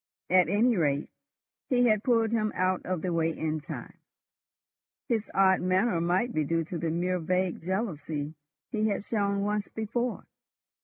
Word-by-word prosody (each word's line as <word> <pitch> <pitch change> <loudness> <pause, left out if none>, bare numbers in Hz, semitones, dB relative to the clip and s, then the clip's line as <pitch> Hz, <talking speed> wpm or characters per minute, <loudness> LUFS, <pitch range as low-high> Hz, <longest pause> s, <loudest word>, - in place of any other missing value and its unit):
At 180 -3 +5
any 225 +5 +3
rate, 145 -3 0 0.6
he 245 -2 +4
had 215 -3 +3
pulled 230 -3 +2
him 215 -2 +1
out 185 0 +1
of 180 -3 -2
the 180 -2 -1
way 165 -1 +2
in 155 0 -1
time. - - -8 1.1
His 225 -4 -1
odd 190 -1 +4
manner 185 0 +2
might 185 +8 +1
be 155 - +1
due 165 +3 0
to 170 +2 -5
the 165 - -1
mere 180 +3 0
vague 180 +1 0
jealousy 160 -6 -3 0.4
he 215 -2 +1
had 200 -1 -1
shown 200 -2 0
once 210 0 -1
before. 235 +3 -3
185 Hz, 160 wpm, -28 LUFS, 170-215 Hz, 1.1 s, At